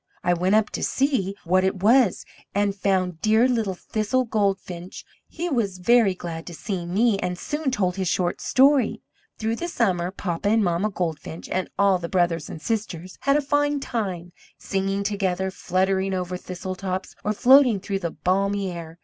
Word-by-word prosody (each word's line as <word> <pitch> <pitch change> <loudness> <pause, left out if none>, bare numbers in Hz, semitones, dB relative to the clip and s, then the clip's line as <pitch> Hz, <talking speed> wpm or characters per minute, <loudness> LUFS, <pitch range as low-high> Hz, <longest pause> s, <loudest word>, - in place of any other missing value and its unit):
I 175 - +3
went 180 +4 +2
up 215 -1 +2
to - - -4
see 260 -9 0
what 185 +2 +2
it 190 0 -1
was, 235 -2 +4 0.3
and 200 0 +2
found 185 -4 0
dear 220 +3 +4
little 225 -7 0
Thistle 220 +7 -1
Goldfinch! 195 -5 -2 0.2
He 345 +2 -4
was 225 - -1
very 210 0 +4
glad 165 -2 -7
to 170 - -7
see 180 -2 -4
me, 205 +3 +2
and 180 -1 -2
soon 295 - -2
told 195 -7 0
his 190 -1 -1
short 175 0 0
story. 275 0 +3 0.3
Through 225 +1 -1
the 345 - -3
summer 185 - 0
Papa 185 0 -2
and 220 0 +3
Mamma 175 +3 +1
Goldfinch 165 -4 -4
and 185 0 -2
all 200 -2 +4
the 170 -1 -5
brothers 170 -4 0
and - - -7
sisters 185 -3 -4
had 275 +1 +3
a - - +1
fine 290 +1 +1
time, 190 -9 -4 0.3
singing 195 +1 -2
together, 190 -2 -1
fluttering 190 +1 0
over 180 0 -3
thistletops, 185 +1 -5
or 210 - 0
floating 250 0 +5
through 195 0 -3
the 170 -3 -2
balmy 195 +4 0
air. 165 -1 -8
195 Hz, 175 wpm, -24 LUFS, 180-220 Hz, 0.3 s, floating